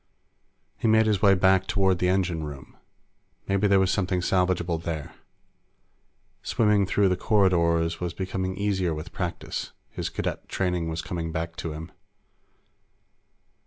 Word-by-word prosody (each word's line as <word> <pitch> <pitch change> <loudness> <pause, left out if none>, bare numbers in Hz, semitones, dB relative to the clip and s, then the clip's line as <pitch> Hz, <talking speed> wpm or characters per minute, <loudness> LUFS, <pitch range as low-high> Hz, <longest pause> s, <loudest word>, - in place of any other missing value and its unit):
He - - 0
made 110 0 +5
his 105 -3 +1
way 100 -2 +6
back 95 0 +3
toward 95 -3 +2
the 90 - +2
engine 90 -4 0
room. 70 -2 -9 0.7
Maybe 100 +1 +2
there 100 -1 +4
was 95 -1 +2
something 95 -2 0
salvageable 90 -2 +1
there. 80 -3 -5 1.3
Swimming 105 -3 +2
through 100 +1 +3
the 90 - +2
corridors 85 -5 +2
was 90 -1 -3
becoming 95 0 -3
easier 95 -5 0
with 75 +3 -7
practice; 90 -3 -4 0.2
his - - -4
Cadet - - -4
training 90 -3 -1
was 80 +1 -3
coming 85 -3 -4
back 80 0 -4
to 80 - -4
him. 80 +3 -8
90 Hz, 140 wpm, -26 LUFS, 85-95 Hz, 1.3 s, way